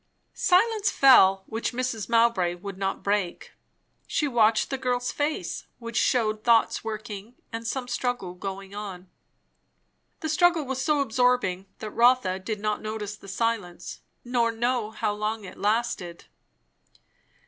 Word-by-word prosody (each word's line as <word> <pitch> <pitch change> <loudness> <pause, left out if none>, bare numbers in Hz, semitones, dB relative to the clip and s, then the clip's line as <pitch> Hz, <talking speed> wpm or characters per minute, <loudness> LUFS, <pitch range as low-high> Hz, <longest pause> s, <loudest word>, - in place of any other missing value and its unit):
Silence 410 +2 +3
fell, 195 - +6
which 225 +2 -3
Mrs. 240 -4 -3
Mowbray 230 -7 +3
would 195 +2 -7
not 195 0 -2
break. 200 -3 -1 0.6
She 300 - 0
watched 225 -3 +3
the 270 - -2
girl's 245 -1 -1
face, 290 - -3
which 230 -1 -8
shewed 215 -4 +1
thoughts 230 -2 +3
working 215 0 -6 0.2
and 230 0 -4
some 250 +1 -3
struggle 245 -7 -2
going 195 +1 -7
on. 190 -3 -7 1.1
The 315 - -2
struggle 335 0 +3
was 265 0 -3
so 300 0 +2
absorbing, 245 -7 +1
that 215 -1 -6
Rotha 235 -6 +3
did 210 +2 -4
not 210 0 -1
notice 215 -1 -4
the 200 - -15
silence, 195 -5 -3 0.3
nor 240 -1 +1
know 235 -1 -1
how 215 -1 -2
long 215 +1 -3
it 185 - -10
lasted. 200 -5 -1
225 Hz, 135 wpm, -26 LUFS, 200-250 Hz, 1.1 s, fell